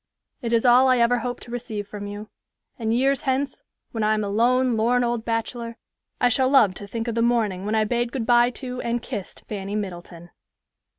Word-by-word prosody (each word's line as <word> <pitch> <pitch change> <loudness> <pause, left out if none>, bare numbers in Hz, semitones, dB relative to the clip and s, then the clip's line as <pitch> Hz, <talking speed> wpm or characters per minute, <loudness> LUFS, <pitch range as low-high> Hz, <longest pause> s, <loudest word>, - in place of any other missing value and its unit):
It 235 -3 -3
is 230 +1 +2
all 250 +2 +6
I 255 -1 +4
ever 240 +1 +3
hope 245 +1 -4
to 235 - -11
receive 225 -4 -5
from 205 0 -7
you; 205 +1 -7 0.5
and 220 -1 -1
years 270 +3 +2
hence, 270 +1 -1 0.3
when 225 -2 -2
I 215 0 +3
am 215 - -1
a 200 - -3
lone, 245 +4 +2
lorn 240 +3 +2
old 235 -1 -1
bachelor, 230 +1 -3 0.4
I 245 - +4
shall 255 +2 +2
love 240 -9 +5
to 200 +2 -9
think 225 +3 -4
of 235 - -1
the 230 - 0
morning 215 -5 +1
when 215 - 0
I 220 - +3
bade 240 +2 -1
good 245 -3 -3
by 240 0 +5
to 250 0 -5
and 235 0 -2
kissed 205 -7 -7
Fanny 200 -1 -5
Middleton." 175 -4 -6
235 Hz, 215 wpm, -24 LUFS, 215-245 Hz, 0.5 s, all